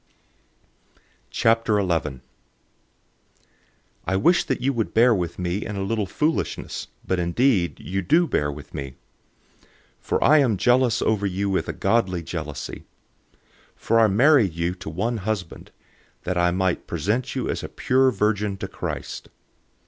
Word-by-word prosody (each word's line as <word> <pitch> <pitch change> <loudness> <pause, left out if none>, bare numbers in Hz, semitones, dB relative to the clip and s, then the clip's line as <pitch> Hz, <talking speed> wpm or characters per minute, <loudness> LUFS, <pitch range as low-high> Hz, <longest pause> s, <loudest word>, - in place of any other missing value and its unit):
011:001 100 - +1 1.9
I 95 - +1
wish 170 - +3
that 135 - -1
you 135 +2 0
would 115 -3 -2
bear 120 +2 +6
with 85 -4 -2
me 90 +2 -2
in 105 - -5
a 100 - -2
little 105 0 -1
foolishness, 155 - -2 0.2
but 95 - 0
indeed 90 +1 +1
you 95 +1 -3
do 160 - +3
bear 75 - 0
with 75 0 -11
me. 70 -1 -6 0.7
011:002 - - -29 0.3
For - - -1
I 155 +1 +6
am 120 -8 +2
jealous 125 +2 +3
over 105 -2 +1
you 100 +1 -1
with 95 - -1
a - - -2
godly 95 -7 0
jealousy. 80 -3 -6 0.9
For 115 +1 +1
I 110 - +6
married 115 - +4
you 85 +1 -1
to 90 -3 -8
one 110 +9 -2
husband, 100 -4 -4 0.5
that 90 - -2
I 90 0 +3
might 95 0 -1
present 105 +10 -2
you - - -2
as - - -2
a - - -6
pure 130 +1 +2
virgin 105 -2 0
to - - -5
Christ. - - -6
100 Hz, 150 wpm, -23 LUFS, 90-115 Hz, 1.9 s, bear